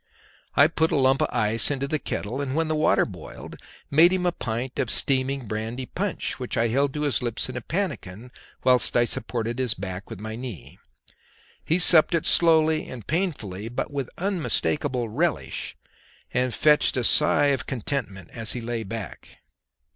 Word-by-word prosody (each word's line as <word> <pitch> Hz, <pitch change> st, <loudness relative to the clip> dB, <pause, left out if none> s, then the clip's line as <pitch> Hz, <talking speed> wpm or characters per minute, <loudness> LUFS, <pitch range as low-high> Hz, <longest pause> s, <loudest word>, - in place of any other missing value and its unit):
I 140 Hz, -, +7 dB
put 160 Hz, 0 st, +1 dB
a -, -, +1 dB
lump 135 Hz, -1 st, +3 dB
of -, -, +3 dB
ice 115 Hz, -1 st, +2 dB
into 140 Hz, -1 st, -2 dB
the 155 Hz, +1 st, -1 dB
kettle, 125 Hz, +3 st, -4 dB
and 135 Hz, -1 st, -3 dB
when 160 Hz, 0 st, 0 dB
the 155 Hz, -, +1 dB
water 155 Hz, -, +3 dB
boiled -, -, -10 dB, 0.3 s
made 165 Hz, +5 st, +6 dB
him 185 Hz, -1 st, 0 dB
a 175 Hz, -, +3 dB
pint 120 Hz, -3 st, -4 dB
of 125 Hz, -, 0 dB
steaming 135 Hz, 0 st, 0 dB
brandy 110 Hz, +4 st, -4 dB
punch, 195 Hz, +2 st, -3 dB
which 125 Hz, -1 st, -3 dB
I 115 Hz, 0 st, +2 dB
held 140 Hz, +4 st, +1 dB
to 150 Hz, -, -2 dB
his 145 Hz, -3 st, +1 dB
lips 120 Hz, 0 st, -2 dB
in 130 Hz, -, -6 dB
a 120 Hz, -, -3 dB
pannikin 125 Hz, -, -4 dB, 0.3 s
whilst 125 Hz, -2 st, +3 dB
I 120 Hz, -, +4 dB
supported 120 Hz, -1 st, -3 dB
his 125 Hz, -3 st, 0 dB
back 95 Hz, 0 st, -6 dB
with 115 Hz, -4 st, -8 dB
my 110 Hz, +1 st, -6 dB
knee; 120 Hz, -, -8 dB, 0.8 s
he 165 Hz, -, +1 dB
supped 175 Hz, -2 st, +6 dB
it 165 Hz, -, 0 dB
slowly 160 Hz, -2 st, +4 dB
and 120 Hz, -5 st, -8 dB
painfully 120 Hz, -, -2 dB
but 120 Hz, -, -4 dB
with 140 Hz, -3 st, -3 dB
unmistakable 145 Hz, -, -1 dB
relish, 155 Hz, +10 st, -2 dB, 0.6 s
and 125 Hz, 0 st, +1 dB
fetched 150 Hz, +3 st, +3 dB
a 125 Hz, -, +1 dB
sigh 145 Hz, +2 st, +3 dB
of 130 Hz, -3 st, -4 dB
contentment 110 Hz, -, -4 dB
as 115 Hz, -2 st, -3 dB
he 125 Hz, -, -4 dB
lay 120 Hz, 0 st, -3 dB
back. 110 Hz, -2 st, -8 dB
130 Hz, 175 wpm, -25 LUFS, 115-150 Hz, 0.8 s, I